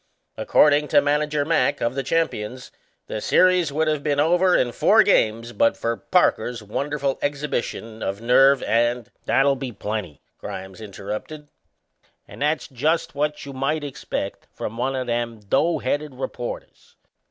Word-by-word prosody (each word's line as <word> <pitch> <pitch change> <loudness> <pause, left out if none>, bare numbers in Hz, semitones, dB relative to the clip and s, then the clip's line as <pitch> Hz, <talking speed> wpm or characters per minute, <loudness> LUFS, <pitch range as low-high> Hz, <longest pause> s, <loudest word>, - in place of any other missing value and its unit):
According 150 0 +3
to - - +5
Manager 150 0 +1
Mack, 160 -5 +1
of 115 - -1
the 135 - -2
champions, 130 -5 -2 0.3
the 105 - -5
series 180 0 +3
would 155 +2 0
have 155 -2 0
been 145 -1 0
over 175 +4 +3
in 120 - +2
four 215 - +5
games 115 - +1
but 115 - +2
for 115 0 -1
Parker's 120 -8 +1
wonderful 140 +5 -2
exhibition 135 -6 -3
of 100 +1 -3
nerve 135 +3 +4
and 120 0 0
" - - -41
"That'll 140 0 +3
be 135 -1 -5
a - - -11
plenty," 100 -7 -5 0.2
Grimes 95 +2 -8
interrupted. 105 +9 -7 0.8
"And - - -12
that's 150 +1 0
just 150 +6 -1
what 150 +1 -2
you 140 - -8
might 140 +4 -1
expect 140 -3 -5
from 110 - -5
one 130 +3 -1
o' 130 - -1
them 120 -1 -2
doughheaded 145 +5 0
reporters. - - -7
135 Hz, 155 wpm, -23 LUFS, 115-150 Hz, 0.8 s, to